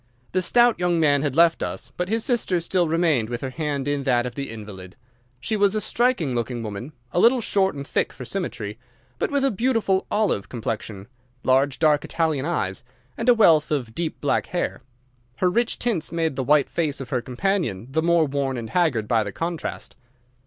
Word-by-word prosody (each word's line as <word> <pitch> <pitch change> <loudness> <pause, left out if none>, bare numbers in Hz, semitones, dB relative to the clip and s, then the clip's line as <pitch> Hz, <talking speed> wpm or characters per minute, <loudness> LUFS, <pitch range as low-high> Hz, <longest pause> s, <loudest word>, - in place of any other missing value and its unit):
The 185 - +1
stout 240 +4 +4
young 175 -1 +1
man 145 -3 +3
had 140 -3 -1
left 165 0 +4
us, 90 +1 -4
but 180 +1 -3
his 225 +1 0
sister 225 -8 +1
still 175 +1 0
remained 155 -8 +1
with 120 0 -4
her 130 - -4
hand 145 -2 -3
in 145 -1 0
that 125 -3 +1
of 125 - -4
the 140 +2 -5
invalid. 100 -5 -9 0.4
She 175 - -2
was 205 0 +3
a - - +2
striking 215 - +1
looking 120 0 -2
woman, 110 +7 -6 0.2
a 175 - 0
little 240 +6 +5
short 195 -5 +1
and 140 0 -6
thick - - 0
for 125 - -9
symmetry, 115 - -4 0.4
but - - 0
with 280 -1 +1
a 275 - +2
beautiful 225 -3 +1
olive 210 - 0
complexion, 110 -4 -5 0.4
large, 135 +1 +2
dark, 155 -2 +3
Italian 160 -4 -1
eyes, 95 - -2 0.3
and 230 +2 0
a 245 - +7
wealth 165 -9 +5
of 125 -7 -2
deep 165 +2 -3
black 145 - 0
hair. 175 - -3 0.5
Her 180 -1 +1
rich 235 +4 0
tints 210 -10 -1
made 165 -3 -1
the 130 - -1
white 145 +1 +3
face 155 -5 -1
of 130 -2 -8
her 125 - 0
companion 130 - -1
the 160 +3 +1
more 170 -1 +3
worn 135 -2 -2
and 115 -2 -6
haggard 135 -12 +1
by 115 -1 +2
the 100 - -5
contrast. 165 - -5
155 Hz, 200 wpm, -23 LUFS, 125-180 Hz, 0.5 s, a